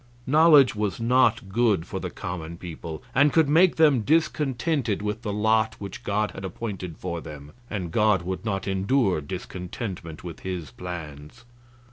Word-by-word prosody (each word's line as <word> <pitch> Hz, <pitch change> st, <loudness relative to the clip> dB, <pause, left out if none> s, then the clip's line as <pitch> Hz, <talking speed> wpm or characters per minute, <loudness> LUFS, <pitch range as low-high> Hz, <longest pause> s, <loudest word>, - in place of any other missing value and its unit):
Knowledge 150 Hz, -1 st, +6 dB
was 105 Hz, -2 st, -2 dB
not 115 Hz, -3 st, +2 dB
good 105 Hz, -5 st, +2 dB
for -, -, -5 dB
the -, -, -4 dB
common 85 Hz, -2 st, -6 dB
people, 80 Hz, -2 st, -7 dB
and 145 Hz, +3 st, +4 dB
could 160 Hz, -1 st, +4 dB
make 165 Hz, +5 st, +5 dB
them 150 Hz, -6 st, +4 dB
discontented 140 Hz, -, 0 dB
with 105 Hz, +2 st, -3 dB
the 110 Hz, -4 st, -3 dB
lot 110 Hz, +1 st, +2 dB
which 100 Hz, +4 st, -8 dB
God 105 Hz, 0 st, 0 dB
had 95 Hz, -, -9 dB
appointed 95 Hz, -3 st, -5 dB
for 85 Hz, -1 st, -4 dB
them, 75 Hz, -2 st, -10 dB, 0.2 s
and 90 Hz, -6 st, -4 dB
God 105 Hz, -3 st, +3 dB
would 95 Hz, +4 st, -4 dB
not 95 Hz, -3 st, -2 dB
endure 95 Hz, -, +1 dB
discontentment 90 Hz, +1 st, -6 dB
with 85 Hz, -2 st, -8 dB
His 90 Hz, -8 st, -5 dB
plans. 80 Hz, -, -8 dB
105 Hz, 155 wpm, -25 LUFS, 90-120 Hz, 0.2 s, Knowledge